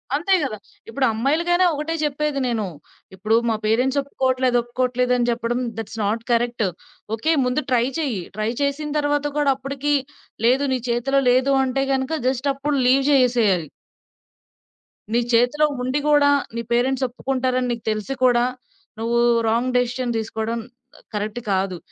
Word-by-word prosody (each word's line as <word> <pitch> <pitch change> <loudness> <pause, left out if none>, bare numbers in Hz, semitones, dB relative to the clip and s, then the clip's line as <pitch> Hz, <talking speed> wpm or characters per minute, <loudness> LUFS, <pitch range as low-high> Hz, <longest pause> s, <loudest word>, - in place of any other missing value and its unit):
అంతే 340 +7 +1
గదా! 255 -6 -3 0.3
ఇప్పుడు 260 +4 0
అమ్మాయిలకైనా 335 +10 +2
ఒకటే 305 +3 -3
జెప్పేది 295 -1 -1
నేను. 225 -4 -1 0.5
ఇప్పుడు 215 +4 +1
మా 225 - +1
పేరెంట్స్ 250 +6 +2
ఒప్పుకోవట్లేదు 260 -2 0
ఒప్పుకోవట్లేదు 250 +1 0
అని 240 -1 0
జెప్పడం 235 +1 -1 0.2
దట్స్ 225 0 -6
నాట్ 220 +3 -1
కరెక్ట్. 235 -1 +1 0.5
ఓకే. 315 +9 +1
ముందు 250 +4 0
ట్రై 240 -1 +3
చెయ్యి. 255 - -1 0.2
ట్రై 215 +1 0
చేసిన 285 +2 -1
తరువాత 290 0 0
కూడా 290 -2 +3
అప్పటికి 275 +2 -2 0.5
లేదు 255 +4 +4
నీ 255 - 0
చేతిలో 240 +4 +1
లేదు 260 +2 +3
అంటే 265 +1 0
గనక 265 +3 -1
జస్ట్ 260 +2 0
అప్పుడు 285 +2 -1
లీవ్ 270 +2 +4
జేసేసెయది. 235 - +3 1.4
నీ 235 - +4
చేతిలో 245 +6 +3 0.2
ఉండి 255 +3 0
గూడా 290 -1 +5 0.3
నీ 235 - -2
పేరెంట్స్ 260 +2 +1
ఒప్పుకుంటారని 255 0 -1
నీకు 235 -2 -4
తెలిసి 215 +5 -3
కూడా 240 -1 +4 0.6
నువ్వు 235 +1 0 0.3
రాంగ్ 240 +3 0
డెసిషన్ 245 -1 -1
తీసుకోవడం 220 +1 -3 0.5
కరెక్ట్ 210 +3 -3
కాదు. 190 -1 0
250 Hz, 140 wpm, -22 LUFS, 235-275 Hz, 1.4 s, గూడా